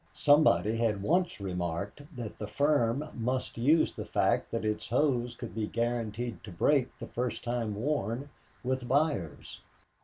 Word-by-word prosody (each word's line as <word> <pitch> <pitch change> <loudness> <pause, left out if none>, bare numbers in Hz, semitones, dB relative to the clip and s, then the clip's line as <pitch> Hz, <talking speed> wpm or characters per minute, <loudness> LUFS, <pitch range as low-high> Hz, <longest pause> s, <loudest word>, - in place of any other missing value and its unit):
Somebody 145 -7 +4
had 110 -4 0
once 175 - +1
remarked 90 - -3
that 120 -4 -6
the 105 - -4
firm 140 +2 +1
must 125 +2 -2
use 145 +8 +4
the - - -5
fact - - +1
that - - -2
its 105 0 -1
hose 125 -1 +1
could 120 - -7
be 110 -1 -2
guaranteed 115 0 -2
to 105 - -9
break 130 - +2
the - - -6
first 125 0 -3
time 120 -3 -1
worn, 125 +1 -1 0.3
with 130 -1 -1
buyers. 135 - -1
120 Hz, 150 wpm, -30 LUFS, 110-140 Hz, 0.3 s, Somebody